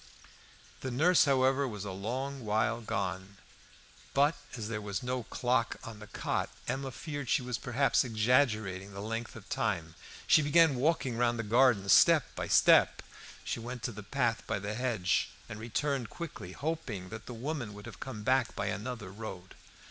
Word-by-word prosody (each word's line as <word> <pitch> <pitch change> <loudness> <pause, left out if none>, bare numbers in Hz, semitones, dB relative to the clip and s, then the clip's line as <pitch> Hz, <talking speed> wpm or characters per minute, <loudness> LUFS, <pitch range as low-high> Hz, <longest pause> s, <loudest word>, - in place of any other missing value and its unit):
The 130 - -4
nurse, 160 +9 +4
however, 135 0 +3
was 105 -4 -6
a 100 - -4
long 130 +8 -4
while 110 +2 +1
gone. 95 -2 -3 0.8
But, 145 +3 +5 0.2
as 110 -2 -4
there 105 -2 -3
was 105 +4 -4
no 125 0 -1
clock 120 +1 0
in 110 -2 -8
the 105 - -10
cot, - - -2 0.2
Emma 135 0 -2
feared 145 -1 -6
she - - +2
was 125 -2 -3
perhaps 130 +4 +2
exaggerating 110 -5 +1
the 100 - -7
length 115 +3 -4
of 110 -2 -11
time. 90 -7 -1 0.3
She - - +6
began 160 +1 +5
walking 135 -2 +1
round 120 0 +2
the 115 - -2
garden, 115 -2 +4
step 100 - +6
by - - -3
step; - - +5 0.4
she - - -3
went 120 +1 -6
into - - -1
the 105 -1 -8
path 115 +2 0
by 110 - 0
the 100 +1 -4
hedge, 110 -7 0 0.2
and 105 - -7
returned 120 +2 -1
quickly, 125 - -7
hoping 125 - -4
that 110 +2 -8
the 125 - -6
woman 125 -4 -4
would 105 +1 -10
have 115 -7 -10
come 115 -6 -6
back 130 0 +2
by - - -2
another 105 -3 -5
road. 95 -3 -8
115 Hz, 175 wpm, -31 LUFS, 105-130 Hz, 0.8 s, She